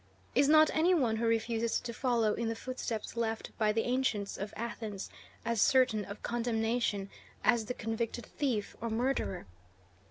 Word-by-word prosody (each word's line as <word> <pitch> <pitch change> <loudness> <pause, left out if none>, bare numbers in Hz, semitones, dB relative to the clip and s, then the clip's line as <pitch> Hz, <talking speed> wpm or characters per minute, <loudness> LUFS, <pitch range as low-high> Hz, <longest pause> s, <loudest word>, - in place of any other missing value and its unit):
Is 275 +2 +4
not 310 0 +7
any 345 +4 +4
one 240 -8 +2
who 230 +1 0
refuses 230 0 +1
to 235 -1 -6
follow 230 -3 +2
in 235 - -2
the 225 - -2
footsteps 235 -3 -4
left 225 -1 -2
by 215 -1 +3
the 225 +1 +1
ancients 245 -5 0
of 200 +1 -5
Athens 220 -3 -5 0.3
as 230 -2 +1
certain 250 -6 +4
of 200 +2 -9
condemnation 225 -3 0 0.3
as 235 -3 +3
the 250 - -4
convicted 225 +1 -3
thief 250 -8 -2
or 230 - -2
murderer? 230 -5 -1
230 Hz, 160 wpm, -32 LUFS, 220-245 Hz, 0.3 s, not